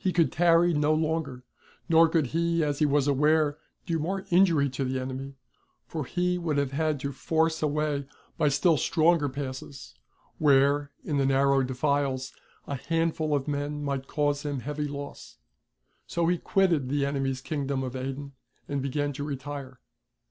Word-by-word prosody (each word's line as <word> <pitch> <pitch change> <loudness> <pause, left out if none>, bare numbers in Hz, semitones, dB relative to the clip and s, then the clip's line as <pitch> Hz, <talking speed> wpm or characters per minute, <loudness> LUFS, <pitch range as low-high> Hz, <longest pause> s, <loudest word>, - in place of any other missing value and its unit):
could 165 -2 +3
tarry 170 0 +4
no 150 +1 +2
longer, 155 -5 -2 0.4
nor 165 -1 +6
could 160 -2 +2
he, 170 0 +1
as 145 -1 -1
he 150 - +4
was 145 -1 +2
aware, 150 +1 +2 0.3
do 165 -1 -1
more 190 +5 -2
injury 170 -6 +4
to 135 +1 -3
the 130 0 -1
enemy; 130 +1 -5 0.5
for 155 -4 -4
he 180 +4 0
would 160 -4 -1
have 140 -2 0
had 155 0 0
to 140 +1 -3
force 160 +4 0
a 155 - +2
way 145 -2 -1 0.3
by 155 - +2
still 150 +4 +3
stronger 160 -1 +2
passes, 130 0 -7 0.5
where, 145 0 +4 0.2
in 145 - -1
the 135 - +2
narrow 135 0 +3
defiles, 130 0 -1 0.3
a - - -4
handful 165 0 0
of 140 0 -2
men 145 0 -2
might 140 -1 -3
cause 145 -1 0
him 145 -3 -3
heavy 150 +2 -3
loss. 140 0 -8 0.7
So 170 -1 0
he 175 0 +1
quitted 170 -9 +1
the 140 0 +1
enemy's 135 -2 -1
Kingdom 140 -2 -2
of 130 0 -5
Aden 135 +2 -5 0.4
and 140 -1 -2
began 145 +2 -1
to 140 - -5
retire. 140 -2 -6
145 Hz, 165 wpm, -27 LUFS, 135-160 Hz, 0.7 s, nor